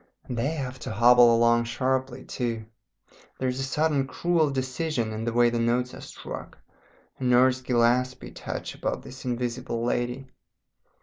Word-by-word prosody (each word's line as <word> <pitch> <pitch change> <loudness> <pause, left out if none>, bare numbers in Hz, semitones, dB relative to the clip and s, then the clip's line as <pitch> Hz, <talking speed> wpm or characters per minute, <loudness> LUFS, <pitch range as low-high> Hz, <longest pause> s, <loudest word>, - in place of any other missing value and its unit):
And 125 - -5
they 120 +3 0
have 135 -4 -5
to - - -6
hobble 120 0 +6
along 120 0 +4
sharply 130 +1 -1
too; 115 -3 -3 0.7
there 130 - -1
is 125 +1 -2
a - - -1
certain 140 +1 +1
cruel 165 0 +1
decision 130 -2 -2
in 110 +1 -4
the 120 - 0
way 120 0 +4
the 120 - -1
notes 120 +2 +1
are - - -9
struck, - - -8 0.6
a - - -5
Nurse 125 +1 +4
Gillespie 125 +1 +1
touch - - -6
about - - -3
this 130 +1 -10
Invisible 120 -1 -2
Lady. 125 +2 -1
125 Hz, 160 wpm, -26 LUFS, 120-130 Hz, 0.7 s, hobble